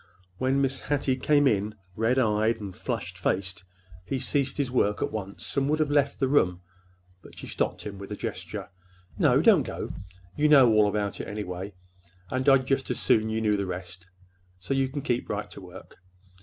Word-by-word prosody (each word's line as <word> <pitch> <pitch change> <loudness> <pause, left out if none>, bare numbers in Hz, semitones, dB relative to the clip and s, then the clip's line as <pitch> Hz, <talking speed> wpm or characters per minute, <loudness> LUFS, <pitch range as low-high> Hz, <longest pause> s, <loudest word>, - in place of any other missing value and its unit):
When 135 +2 +2
Mrs. 135 0 0
Hattie 140 -2 +1
came 145 +2 +3
in, 105 -3 +1 0.2
red 115 +5 +1
eyed 110 -2 +2
and 100 -3 -7
flushed 90 +1 -4
faced, 95 0 -1 0.4
he 135 +8 -2
ceased 135 +1 -1
his 140 -4 -1
work 105 -5 +1
at - - -2
once 100 -2 -6
and 140 0 +1
would 155 - +2
have 155 -2 0
left 140 -1 +2
the 135 - +2
room, 90 -10 +2 0.6
but - - -15
she - - -7
stopped - - -2
him 100 -2 -7
with 100 +1 -9
a - - -2
gesture. 95 -2 -5 0.5
"No, - - +4
don't - - +6
go. - - -5 0.4
You 150 +1 +3
know 135 -6 +7
all 105 -1 +5
about 100 -1 -2
it, - - -7
anyway,—and 90 +3 -5
I'd 135 -1 +5
just 135 0 0
as 125 - -1
soon 110 0 +3
you 110 0 -1
knew 105 -2 +2
the 100 -1 -2
rest. 90 0 -7 0.5
So 90 +9 -3
you 135 -1 +1
can 140 0 -5
keep 120 0 -1
right - - -3
to - - -10
work. - - -13
110 Hz, 195 wpm, -27 LUFS, 95-135 Hz, 0.6 s, know